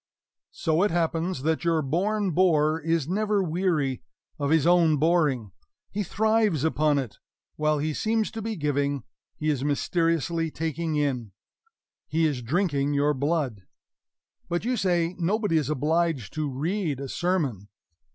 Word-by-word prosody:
So 160 +1 0
it 205 - +3
happens 165 -2 -1
that 160 +1 0
your 165 -2 +2
born 195 +7 0
bore 160 -3 +3
is 165 -2 0
never 205 +2 +1
weary 160 -6 0 0.4
of 140 -1 0
his 160 -2 +3
own 170 -3 +4
boring; 145 - +1 0.4
he 210 - -2
thrives 215 -4 +1
upon 155 -2 +2
it; 130 -6 -4 0.4
while 155 0 +1
he 155 +2 -1
seems 220 +4 0
to 225 - -5
be 220 +1 -3
giving, 145 - -1 0.3
he 155 0 0
is 135 -3 -2
mysteriously 165 +2 0
taking 160 +1 -3
in 130 -8 -1 0.7
he 160 +1 +1
is 145 -5 0
drinking 145 - 0
your 145 +1 +2
blood. 140 - -1 0.9
But 175 +4 -1
you 250 +1 +1
say 175 -5 +1
nobody 200 0 +1
is 150 -2 0
obliged 155 - 0
to 155 -2 -2
read 155 +2 -2
a 140 - -5
sermon. 140 - -1
160 Hz, 145 wpm, -26 LUFS, 145-175 Hz, 0.9 s, own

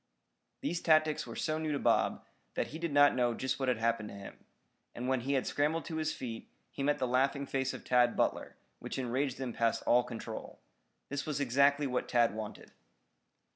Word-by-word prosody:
These 175 -11 -2
tactics 155 -1 +3
were - - -7
so 155 0 -1
new 155 -1 -2
to - - 0
Bob, - - +1 0.3
that - - -1
he 160 - -7
did 170 -2 -2
not 145 0 +6
know 120 -2 +1
just 130 +3 -2
what 135 - -1
had 125 - +2
happened 115 -1 0
to - - -9
him. 100 0 -11 0.5
And 125 +1 -4
when 130 -1 +1
he 135 +4 -1
had 135 - +1
scrambled 155 +3 0
to 160 - -4
his 155 0 0
feet, 115 -3 -6 0.2
he - - -6
met 145 +1 +2
the 130 - 0
laughing 135 +3 +1
face 135 -1 -1
of - - -8
Tad 125 -1 +3
Butler, - - 0 0.2
which - - -5
enraged 130 +1 -1
him 130 -3 -4
past 115 0 0
all 125 - +5
control. 115 -2 -7 0.5
This 140 +1 -3
was 150 -2 -1
exactly 140 +2 +3
what 125 -2 -2
Tad 120 -3 +3
wanted. 110 -1 -7
135 Hz, 205 wpm, -32 LUFS, 120-145 Hz, 0.5 s, not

